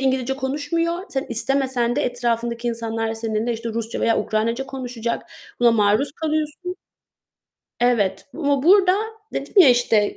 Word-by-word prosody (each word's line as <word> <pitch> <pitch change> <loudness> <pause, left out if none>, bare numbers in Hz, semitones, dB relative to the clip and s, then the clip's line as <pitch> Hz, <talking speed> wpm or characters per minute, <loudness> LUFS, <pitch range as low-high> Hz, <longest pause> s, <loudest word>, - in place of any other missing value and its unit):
İngilizce 265 -1 0
konuşmuyor. 320 +6 -1
Sen 270 0 -2
istemesen 255 -1 +1
de - - +1
etrafındaki 235 -1 -1
insanlar 225 -1 -2
seninle, 225 +1 -2
işte, 230 +1 -5
Rusça 225 0 -4
veya 230 - +2
Ukraynaca 230 +5 -1
konuşacak. 250 -3 -4 0.4
Buna 240 - +6
maruz 220 +5 +2
kalıyorsun. 310 +4 -3 1.0
Evet 235 -6 +1
ama 285 -4 0
burada 370 +2 +6 0.4
dedim - - -5
ya, 365 -7 +9
işte, 235 -4 +3
245 Hz, 130 wpm, -22 LUFS, 230-280 Hz, 1.0 s, ya